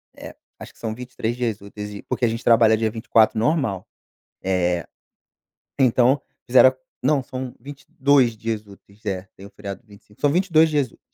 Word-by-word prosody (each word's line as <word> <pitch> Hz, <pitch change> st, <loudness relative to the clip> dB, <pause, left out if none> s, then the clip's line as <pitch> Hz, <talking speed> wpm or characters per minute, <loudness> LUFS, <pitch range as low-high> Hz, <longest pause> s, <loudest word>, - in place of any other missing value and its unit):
é, -, -, -10 dB, 0.2 s
acho -, -, -10 dB
que -, -, -25 dB
são 110 Hz, -1 st, -4 dB
23 125 Hz, -1 st, -4 dB
dias 115 Hz, -5 st, -2 dB
úteis, 105 Hz, +1 st, -8 dB
e, 100 Hz, -, -8 dB
porque 125 Hz, -, -1 dB
a -, -, +3 dB
gente 115 Hz, +1 st, -3 dB
trabalha 115 Hz, -1 st, +5 dB
dia 110 Hz, 0 st, 0 dB
24 110 Hz, 0 st, +2 dB
normal, 115 Hz, -, 0 dB, 0.6 s
eh, 90 Hz, -2 st, 0 dB, 0.9 s
então 130 Hz, +1 st, +3 dB, 0.2 s
fizeram 130 Hz, +1 st, +6 dB, 0.3 s
não, 140 Hz, +1 st, +3 dB
são 130 Hz, -1 st, -6 dB
22 140 Hz, -2 st, +1 dB
dias 110 Hz, -1 st, -3 dB
úteis, 100 Hz, +1 st, -19 dB
é, 95 Hz, -1 st, -3 dB
tem 95 Hz, -, -11 dB
o -, -, -14 dB
feriado 100 Hz, -2 st, -8 dB
de 115 Hz, -, -34 dB
25, 105 Hz, 0 st, -19 dB
são 145 Hz, -, +3 dB
22 160 Hz, -2 st, +3 dB
dias 145 Hz, -3 st, +1 dB
úteis. -, -, -22 dB
115 Hz, 180 wpm, -22 LUFS, 105-130 Hz, 0.9 s, fizeram